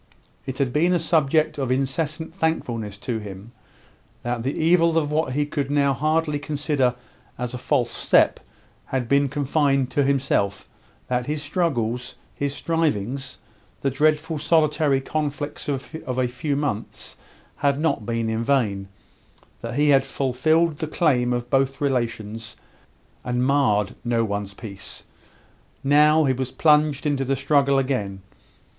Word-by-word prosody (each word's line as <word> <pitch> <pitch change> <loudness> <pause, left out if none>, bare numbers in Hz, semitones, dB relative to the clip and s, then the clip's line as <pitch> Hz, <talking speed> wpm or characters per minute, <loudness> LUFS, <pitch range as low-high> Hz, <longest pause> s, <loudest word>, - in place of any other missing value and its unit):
It 130 -1 -4
had 135 -4 0
been 170 +4 +3
a 175 - +2
subject 155 -2 +2
of 130 -2 -1
incessant 155 +5 -1
thankfulness 120 - -2
to 115 -3 -1
him, 100 +1 -9 0.7
that 120 -1 -2
the 135 +5 -2
evil 165 0 +4
of 150 -2 +1
what 150 -4 0
he 145 +2 +1
could 145 -2 -3
now 140 -1 +2
hardly 155 +2 0
consider 145 -3 0 0.4
as 125 0 -4
a 125 - -5
false 125 -3 0
step - - +3 0.5
had 130 -3 -2
been 140 +1 +3
confined 140 -1 +1
to 145 - +2
himself 135 -8 0 0.4
that 125 -1 -1
his 150 0 -2
struggles, 125 -7 -1 0.2
his 140 0 -2
strivings, 140 -7 -1 0.4
the 135 - 0
dreadful 155 +3 +1
solitary 150 -3 +2
conflicts 145 0 -3
of 135 +2 -4 0.2
a 130 -1 +2
few 140 +4 -2
months, 140 -7 -4 0.4
had 140 0 +1
not 155 -7 0
been 115 +1 -2
in 110 +1 -1
vain; 110 -8 +1 0.7
that - - -5
he 150 +1 +3
had 135 -1 +5
fulfilled 155 +5 +1
the 160 0 -3
claims 135 -7 +2
of 120 0 -5
both 135 +1 +1
relations, 115 -5 -2 0.7
and 125 0 0
marred 115 -8 +2
no 115 -1 +1
one's 100 -1 -4
peace. 105 -2 -7 0.8
Now, 150 +3 +5
he 135 -3 +2
was 130 0 -3
plunged 150 0 +3
into 145 -2 +1
the 135 +1 0
struggle 140 0 +2
again. 105 -8 -1
140 Hz, 145 wpm, -23 LUFS, 125-150 Hz, 0.8 s, had